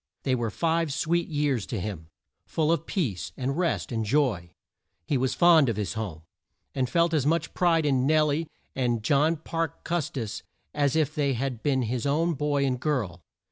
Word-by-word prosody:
They 130 - +1
were 120 -3 0
five 165 +4 0
sweet 170 +4 0
years 145 - 0
to 115 - -3
him; 90 -5 -5 0.4
full 160 0 +1
of 165 -4 0
peace, 125 - -2
and 135 +1 -1
rest, 170 -5 -1
and 115 -2 -1
joy. 110 -7 +1 0.6
He 145 - 0
was 130 0 0
fond 165 -6 +6
of 115 - -1
his 105 -3 -2
home, 100 -8 -5 0.5
and 130 -2 -1
felt 170 +2 +2
as 145 -3 +2
much 165 +2 0
pride 165 -3 +2
in 135 -2 +2
Nel 155 0 +4
lie 155 +3 -1 0.3
and 120 -4 0
John 150 +6 +3
Parke 165 0 -4
Cus 170 -4 -1
tis 115 -5 -5 0.3
as 145 -1 +1
if 155 -2 +1
they 140 -3 +1
had 125 -1 -3
been 135 -3 +1
his 120 +3 -2
own 165 +4 +2
boy 145 -1 0
and 130 -2 0
girl. 115 - -1
140 Hz, 190 wpm, -27 LUFS, 120-160 Hz, 0.6 s, fond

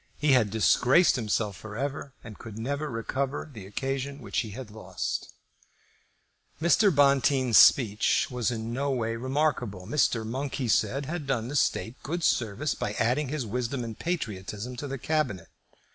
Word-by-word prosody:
He 150 0 +2
had 125 -5 +4
disgraced 125 - +4
himself 105 -4 -1
for 105 +2 -9
ever 140 +1 -3
and 110 -3 -11
could 110 -2 -9
never 140 +6 -3
recover 130 +5 -3
the 105 -5 -9
occasion 135 +5 -3
which 130 - -2
he 110 - -3
had 115 +1 -8
lost. 110 +1 -4 1.3
Mr. 170 +6 +4
Bonteen's 140 - +4
speech 110 -5 +5
was 125 -3 0
in 115 -1 -4
no 140 +3 -1
way 115 -4 -1
remarkable. 125 -7 -1
Mr. 115 -1 +1
Monk, 135 +5 -3
he 130 - -2
said, 115 +6 +1
had 155 0 -5
done 120 -3 -1
the 145 - -5
State 130 -2 0
good 170 +3 -3
service 120 +5 +1
by 105 - -3
adding 125 +6 +1
his 140 -2 -3
wisdom 125 +3 -2
and 115 -2 -7
patriotism 110 - -4
to 145 - -5
the 135 0 -4
Cabinet. 130 - -1
125 Hz, 160 wpm, -27 LUFS, 110-140 Hz, 1.3 s, speech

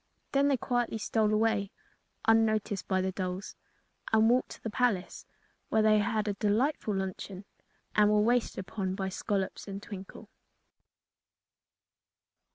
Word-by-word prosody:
Then 280 +1 +3
they 275 -2 +3
quietly 245 -2 -1
stole 215 0 +1
away, 215 -2 +2 0.6
unnoticed 220 -3 +2
by 190 -1 +1
the 190 0 -1
dolls, 185 +1 -4 0.6
and 220 +1 +5
walked 250 +1 +2
to - - -16
the 225 - -3
palace, 210 -7 -1 0.4
where 220 - +3
they 215 0 +5
had 215 +1 0
a 205 - +1
delightful 215 +2 0
luncheon 190 0 -5 0.5
and 210 0 +5
were 210 0 +4
waited 240 +3 +2
upon 190 0 -3
by 190 -1 -2
Scollops 195 +1 -2
and 195 0 -5
Twinkle. 195 -2 -9
210 Hz, 135 wpm, -30 LUFS, 195-225 Hz, 0.6 s, and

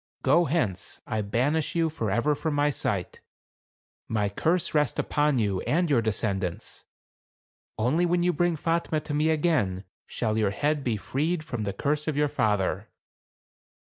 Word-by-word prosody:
Go 170 0 +4
hence; 125 - -2
I 110 - -2
banish 140 - 0
you 165 -1 +2
for 150 -9 -3
ever 120 +9 +2
from 150 +1 -2
my 145 0 +2
sight. - - -3 0.9
My 105 -2 0
curse 165 - 0
rest 150 -4 +1
upon 150 -2 +1
you 100 -5 0
and 170 +1 +1
your 125 -5 +4
descendants; 100 -5 -2 0.9
only 150 +10 +2
when 175 0 +1
you 180 0 +2
bring 175 +2 +1
Fatme 165 0 0
to 150 - -5
me 150 +2 +2
again, 145 - +1 0.2
shall 110 -2 -1
your 105 -2 +2
head 145 +8 -1
be 120 -4 0
freed 155 - -1
from 120 -8 -4
the 100 - -1
curse 150 +8 -1
of 155 -2 -1
your 150 0 +2
father." 105 -6 0
145 Hz, 160 wpm, -27 LUFS, 110-160 Hz, 0.9 s, Go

